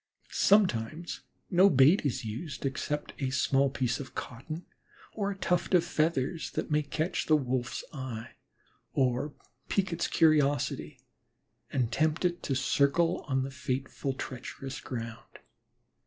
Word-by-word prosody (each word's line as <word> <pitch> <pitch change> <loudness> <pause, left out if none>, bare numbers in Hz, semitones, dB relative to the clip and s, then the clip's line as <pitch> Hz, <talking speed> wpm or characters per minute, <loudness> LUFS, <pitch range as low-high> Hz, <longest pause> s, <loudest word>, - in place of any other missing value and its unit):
Sometimes 170 - +2 0.3
no 185 +2 +7
bait 145 +5 +6
is 120 -3 -3
used 125 +7 -5
except 145 +2 -2
a - - +1
little 135 +1 +2
piece 125 -2 -1
of 135 -3 -8
cotton 155 +8 -6 0.5
or 200 -2 -1
a 200 - -4
tuft 180 -1 +1
of 175 - +5
feathers 160 -2 0
that - - -3
may 150 0 +3
catch 155 +4 -2
the 155 - +6
Wolf's 130 -3 -1
eye 130 -5 -6 0.6
or 130 +2 +1 0.3
pique 190 -3 +1
its 170 - 0
curiosity 145 -4 +2 0.7
and 125 -3 0
tempt 155 +6 +1
it 175 0 0
to 135 - -1
circle 140 +6 +2
on 135 -2 +1
the 135 - -4
fateful, 135 0 -3
treacherous 130 +1 -6
ground. 115 -2 -7
140 Hz, 135 wpm, -30 LUFS, 130-165 Hz, 0.7 s, no